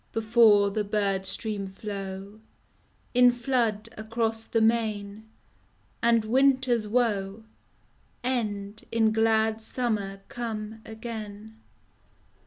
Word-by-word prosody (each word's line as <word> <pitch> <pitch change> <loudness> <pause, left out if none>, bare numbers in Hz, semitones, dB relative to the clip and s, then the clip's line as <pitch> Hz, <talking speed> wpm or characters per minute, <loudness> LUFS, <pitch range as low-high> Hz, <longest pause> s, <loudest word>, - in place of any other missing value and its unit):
Before 220 -2 +5
the 210 +1 -1
bird 200 -2 0
stream 205 0 -3
flow 195 0 -7 0.7
In 250 0 +7
flood 240 -3 0
across 225 +1 -2
the 225 - 0
main 220 -2 0 0.7
And 230 -2 +3
winter's 260 -2 +3
woe 210 -3 0 0.8
End 215 -4 -2
in 225 -1 +3
glad 220 0 +2
summer 215 -4 -2
come 220 -2 -5
again. 220 -1 -8
220 Hz, 90 wpm, -27 LUFS, 205-230 Hz, 0.8 s, In